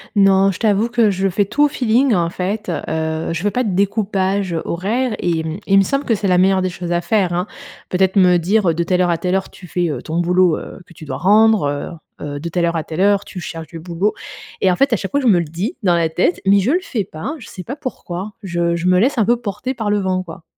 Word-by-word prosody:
Non, 195 Hz, -1 st, +4 dB
je 175 Hz, -, -8 dB
t'avoue 215 Hz, +1 st, +2 dB
que 235 Hz, -3 st, +3 dB
je 195 Hz, 0 st, 0 dB
fais 200 Hz, +2 st, +1 dB
tout 235 Hz, +9 st, +1 dB
au 295 Hz, -, +6 dB
feeling 250 Hz, -1 st, +2 dB
en 170 Hz, -3 st, +1 dB
fait, 200 Hz, +5 st, -3 dB
heu, 160 Hz, +1 st, -2 dB
je 170 Hz, +3 st, -4 dB
veux 205 Hz, -, +1 dB
pas 250 Hz, -, 0 dB
de 205 Hz, -6 st, -1 dB
découpage 195 Hz, -2 st, 0 dB
horaire 220 Hz, +7 st, -1 dB
et 165 Hz, -2 st, 0 dB
mmh, 160 Hz, +2 st, -4 dB
il 195 Hz, -, +4 dB
me 195 Hz, -, +6 dB
semble 275 Hz, +7 st, -1 dB
que 230 Hz, -, +2 dB
c'est 200 Hz, -1 st, -2 dB
la 180 Hz, -1 st, +3 dB
meilleure 190 Hz, +1 st, +3 dB
des 185 Hz, -, 0 dB
choses 175 Hz, 0 st, -6 dB
à 175 Hz, 0 st, +1 dB
faire, 185 Hz, 0 st, +1 dB
hein. 175 Hz, +1 st, -1 dB, 0.4 s
Peut-être 190 Hz, +1 st, +1 dB
me 180 Hz, -2 st, +5 dB
dire, 190 Hz, +2 st, +2 dB
heu,: -, -, +2 dB
«De 170 Hz, -, -1 dB
telle 180 Hz, +1 st, +1 dB
heure 180 Hz, -, +2 dB
à 170 Hz, -, +1 dB
telle 180 Hz, +1 st, -1 dB
heure, 190 Hz, -, -1 dB
tu 180 Hz, -, -13 dB
fais, 175 Hz, +1 st, -1 dB
heu, 150 Hz, -, -4 dB
ton 165 Hz, +2 st, -3 dB
boulot, 180 Hz, -1 st, +3 dB
heu, -, -, -9 dB
que -, -, -17 dB
tu 160 Hz, -, -12 dB
dois 135 Hz, -, -4 dB
rendre, 215 Hz, -1 st, +4 dB, 0.5 s
heu, -, -, -6 dB
heu, 145 Hz, 0 st, -5 dB
de 170 Hz, +3 st, -5 dB
telle 170 Hz, 0 st, 0 dB
heure 170 Hz, 0 st, -1 dB
à 160 Hz, -, -1 dB
telle 160 Hz, +4 st, -4 dB
heure, 200 Hz, 0 st, +3 dB
tu 185 Hz, -, -8 dB
cherches 165 Hz, -2 st, -7 dB
du 165 Hz, -, -9 dB
boulot» 180 Hz, +5 st, -1 dB, 0.5 s
et 190 Hz, -, +4 dB
en 180 Hz, -, +1 dB
fait 275 Hz, +2 st, +2 dB
à -, -, +5 dB
chaque 195 Hz, -, -5 dB
fois 285 Hz, -, +1 dB
je 260 Hz, -, 0 dB
me 190 Hz, -6 st, +5 dB
le 170 Hz, -, -1 dB
dis, 180 Hz, -, -4 dB
dans 175 Hz, -3 st, +3 dB
la 165 Hz, -1 st, +1 dB
tête, 175 Hz, +2 st, 0 dB
mais 200 Hz, +1 st, +5 dB
je 205 Hz, +7 st, +1 dB
le 355 Hz, -, +3 dB
fais 245 Hz, -, -3 dB
pas, 175 Hz, -, -6 dB
je 230 Hz, -, -11 dB
sais 185 Hz, -, -9 dB
pas 270 Hz, -, -6 dB
pourquoi, 210 Hz, -8 st, -6 dB
je 170 Hz, -2 st, 0 dB
je 170 Hz, +1 st, -2 dB
me 180 Hz, 0 st, +4 dB
laisse 255 Hz, +7 st, +2 dB
un 220 Hz, -, +3 dB
peu 240 Hz, +2 st, +3 dB
porter 220 Hz, +5 st, -4 dB
par 220 Hz, -4 st, -3 dB
le 205 Hz, 0 st, +2 dB
vent 185 Hz, -1 st, -1 dB
quoi. 165 Hz, -1 st, -11 dB
190 Hz, 285 wpm, -18 LUFS, 170-210 Hz, 0.5 s, au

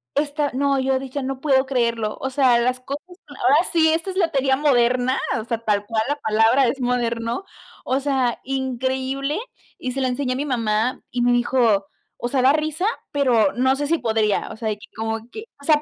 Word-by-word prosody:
esta 290 Hz, 0 st, 0 dB
no, 275 Hz, +1 st, +1 dB
yo 265 Hz, 0 st, +1 dB
decía: 270 Hz, +1 st, -5 dB
"No 265 Hz, 0 st, -4 dB
puedo 265 Hz, -2 st, +3 dB
creerlo". 235 Hz, -5 st, -1 dB
O 265 Hz, -, -1 dB
sea, 255 Hz, -3 st, +4 dB
las 250 Hz, +1 st, 0 dB
cosas, 280 Hz, +3 st, -6 dB, 0.2 s
ahora 280 Hz, -2 st, +2 dB, 0.2 s
sí, 320 Hz, -1 st, +4 dB
esta 330 Hz, +4 st, -1 dB
es 370 Hz, -, -5 dB
lotería 280 Hz, -8 st, +2 dB
moderna, 255 Hz, -2 st, +2 dB, 0.2 s
o -, -, -4 dB
sea, 230 Hz, 0 st, -2 dB
tal 205 Hz, -1 st, +1 dB
cual 225 Hz, -1 st, 0 dB
la 290 Hz, -, 0 dB
palabra 225 Hz, +5 st, +3 dB
es 270 Hz, +4 st, -1 dB
moderno, 240 Hz, +1 st, -1 dB, 0.4 s
o 260 Hz, +2 st, 0 dB
sea, 265 Hz, -4 st, 0 dB
increíble, 265 Hz, -, -2 dB, 0.4 s
y 255 Hz, -, -4 dB
se 270 Hz, -, -4 dB
la 260 Hz, -, +1 dB
enseñé 255 Hz, 0 st, -1 dB
a -, -, -4 dB
mi 290 Hz, -, -2 dB
mamá 230 Hz, -2 st, 0 dB
y 245 Hz, -, -2 dB
me 245 Hz, 0 st, +3 dB
dijo: 235 Hz, -5 st, +2 dB, 0.3 s
"O 240 Hz, -, -3 dB
sea, 260 Hz, 0 st, +1 dB
da 265 Hz, +2 st, +5 dB
risa, 310 Hz, +4 st, -1 dB, 0.3 s
pero 270 Hz, -3 st, +3 dB
no 260 Hz, +2 st, +2 dB
sé 290 Hz, +1 st, -2 dB
si 335 Hz, +1 st, +2 dB
podría". 220 Hz, -4 st, 0 dB
O -, -, -7 dB
sea, 220 Hz, -1 st, -2 dB
y 210 Hz, -, -4 dB
que 210 Hz, -, -14 dB
¿cómo 225 Hz, +1 st, -2 dB
qué? 435 Hz, +1 st, -8 dB, 0.2 s
O -, -, -12 dB
sea, 300 Hz, -1 st, +4 dB
260 Hz, 210 wpm, -22 LUFS, 235-280 Hz, 0.4 s, da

